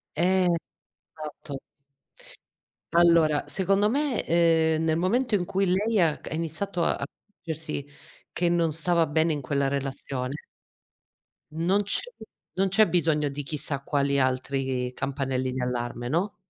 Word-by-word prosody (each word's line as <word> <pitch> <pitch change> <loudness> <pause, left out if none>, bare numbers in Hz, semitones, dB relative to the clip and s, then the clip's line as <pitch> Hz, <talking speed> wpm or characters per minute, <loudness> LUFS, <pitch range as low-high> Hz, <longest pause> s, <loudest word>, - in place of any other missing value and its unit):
Eh, 180 +3 +3 0.7
esatto. 150 -2 -7 1.4
Allora 170 -3 +5
secondo 195 +2 +2
me, 280 0 +1
ehm, 160 -1 +3
nel 160 0 +1
momento 230 +7 +1
in 180 -4 +1
cui 195 +1 0
lei 205 +5 +1
ha 165 -5 +3
c - - -7
ha - - -3
iniziato 170 +3 -3
a - - +2
accorgersi 160 -7 -6 0.4
che 175 -1 0
non 170 -2 +2
stava 165 +1 +2
bene 160 +2 +2
in 150 - -2
quella 140 +1 0
relazione 135 -1 -3 1.2
non 170 +6 +1
c'è 205 - 0 0.5
non 195 +1 +1
c'è 215 +3 +4
bisogno 155 -5 +1
di 145 +1 -5
chissà 140 -1 -3
quali 140 0 +1
altri 130 -1 -1
campanelli 130 -1 -2
di 130 - -3
allarme, 120 -1 -3
no? 175 +9 -1
160 Hz, 135 wpm, -26 LUFS, 140-180 Hz, 1.4 s, Allora